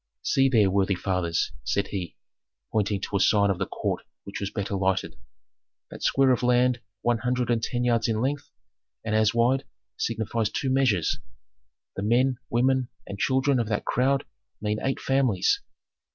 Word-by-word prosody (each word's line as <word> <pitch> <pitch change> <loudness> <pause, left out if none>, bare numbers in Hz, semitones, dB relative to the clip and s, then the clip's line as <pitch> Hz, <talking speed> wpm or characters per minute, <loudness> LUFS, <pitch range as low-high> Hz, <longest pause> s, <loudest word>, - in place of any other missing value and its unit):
"See 135 0 +3
there, 105 -6 +4
worthy 100 0 +2
fathers," 90 -3 -1
said - - -1
he, 90 -4 -5 0.5
pointing 105 -2 0
to 100 - -2
a - - -1
part 100 0 +4
of 95 - -3
the - - -1
court - - -2 0.2
which 100 - -7
was 100 - -3
better 100 0 -4
lighted. 95 -1 0 0.8
"That - - -9
square 135 -1 +3
of 125 - +1
land 125 0 +3 0.2
one 120 -1 +2
hundred 125 0 0
and 115 -1 +1
ten 120 +1 -1
yards 120 -2 +2
in 110 -2 0
length 145 +5 -2 0.6
and 110 - -1
as 110 +1 +3
wide 125 +4 +3 0.3
signifies 110 -1 -1
two 130 +4 -2
measures; 125 -11 +2 0.8
the - - -4
men, 125 +5 +2
women, 130 +1 +2 0.2
and 100 - -7
children 130 +2 +2
of 115 - -1
that 105 -1 -2
crowd 135 +2 +1 0.3
mean 105 +1 -1
eight 135 0 -1
families. 130 -9 +2
115 Hz, 165 wpm, -26 LUFS, 100-130 Hz, 0.8 s, there